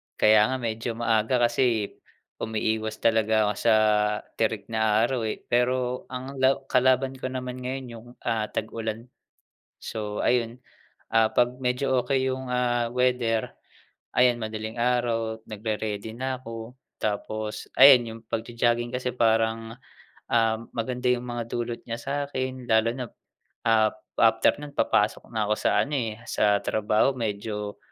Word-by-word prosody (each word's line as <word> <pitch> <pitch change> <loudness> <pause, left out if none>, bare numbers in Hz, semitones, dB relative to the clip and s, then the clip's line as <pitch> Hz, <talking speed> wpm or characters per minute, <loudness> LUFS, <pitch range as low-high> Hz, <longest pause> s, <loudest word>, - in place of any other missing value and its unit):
kaya 105 0 +5
nga 130 - -1
medyo 115 0 -3
maaga 115 +1 +1
kasi 120 -4 0 0.4
umiiwas 110 0 -2
talaga 110 -1 +3
ako - - 0
sa 115 -1 +4 0.7
tirik 110 -1 -1
na 110 0 +2
araw 120 -2 0
eh. 110 - -4
Pero 125 +1 +1
ang 130 +2 -7
law 130 +1 +3
kalaban 130 +1 +3
ko 130 - -4
naman 125 0 -5
ngayon, 130 +1 -4
yung, 115 +1 -11 0.2
ah, 110 -2 0
tag-ulan. 115 +2 -4 0.7
So 105 -2 -4
ayun, 120 0 +1 0.5
ah, 115 -1 +4
'pag 125 +1 +1
medyo 130 +1 0
okey 130 +1 +1
yung, 130 0 -4
ah, 120 -1 +1
weather, 125 -3 +1 0.6
ayan, 125 -1 +4
madaling 110 +1 -5
araw, 115 -2 0
nagre-ready 110 0 -4
na 130 +1 -2
ako. 115 0 -8 0.3
Tapos 110 0 -3
ayan 135 -2 +9
yung 115 0 -8
pagjo-jogging 120 +1 -1
kasi 125 0 -1
parang, 115 -1 +1 0.5
um, 115 -1 +2 0.2
maganda 125 +2 -2
yung 125 0 +1
mga 120 -1 -4
dulot 120 0 -3
niya 115 - -2
sa 135 +4 -5 0.2
akin, 130 -2 -4
lalo 110 0 +3
nap 125 -3 -6 0.5
ap, 110 -1 +3 0.2
after 110 0 +4
no'n, 145 -1 -9
papasok 105 -1 +1
na 110 -2 -1
ako 105 - +3
sa - - +2
ano, 150 - -3
eh, 115 -5 -2
sa 105 -1 +3
trabaho. 110 +5 +1
Medyo, 105 -2 -4
115 Hz, 140 wpm, -26 LUFS, 110-125 Hz, 0.7 s, ayan